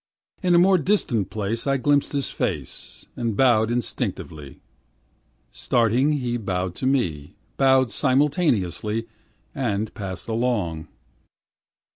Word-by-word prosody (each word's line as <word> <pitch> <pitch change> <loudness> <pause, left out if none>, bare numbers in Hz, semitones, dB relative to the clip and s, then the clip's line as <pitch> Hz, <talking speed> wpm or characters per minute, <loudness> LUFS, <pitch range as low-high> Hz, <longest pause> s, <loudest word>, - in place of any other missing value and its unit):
In 180 -3 +3
a - - +7
more 185 +1 +5
distant 135 - 0
place 110 +4 -3
I 135 0 +2
glimpsed 145 +3 +1
his 140 -2 -1
face, - - -4
And 115 -4 -2
bowed 115 -4 +4
instinctively; 80 - -4 0.9
Starting 120 +5 +2
he 125 -4 -1
bowed 95 -4 -2
to 130 - -1
me, 85 - -1 0.2
Bowed 130 -2 +4
simultaneously, 125 - +1 0.5
and 110 -6 -2
passed 95 -3 -6
along. 110 -9 -1
120 Hz, 110 wpm, -23 LUFS, 100-135 Hz, 0.9 s, a